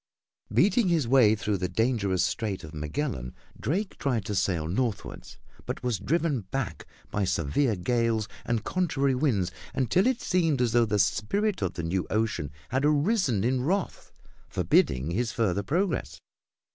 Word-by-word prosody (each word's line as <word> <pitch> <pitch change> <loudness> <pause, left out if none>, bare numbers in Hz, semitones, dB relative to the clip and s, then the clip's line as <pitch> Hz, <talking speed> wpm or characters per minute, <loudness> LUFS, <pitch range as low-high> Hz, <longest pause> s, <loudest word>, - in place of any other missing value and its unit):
Beating 215 +1 +3
his 165 -8 +2
way 120 -4 +5
through 105 -1 -1
the 90 0 -2
dangerous 100 -3 +1
Strait 100 -5 -2
of 80 0 -9
Magellan, 75 - -3 0.2
Drake 190 +7 -2
tried 120 -7 0
to 105 - -3
sail 90 -5 0
northward, 110 +4 -2 0.4
but - - -4
was 120 -6 0
driven 160 -4 0
back 115 +6 -4 0.2
by 105 - 0
severe 95 - +1
gales 115 +2 0 0.2
and 115 -2 -1
contrary 145 -6 +1
winds 120 - +1 0.2
until 155 - +2
it 260 -2 +1
seemed 165 -6 +1
as 125 -2 +2
though 120 0 +4
the 105 -1 0
spirit 110 - +1
of 95 -3 -1
the 85 - -4
new 90 +3 -1
ocean 110 -9 -1 0.2
had 130 +3 0
arisen 150 - +2
in 125 +2 +1
wrath, 190 +6 -2 0.4
forbidding 65 +5 +2
his 115 +5 0
further 100 -4 0
progress. 175 - -1
115 Hz, 155 wpm, -27 LUFS, 95-145 Hz, 0.4 s, way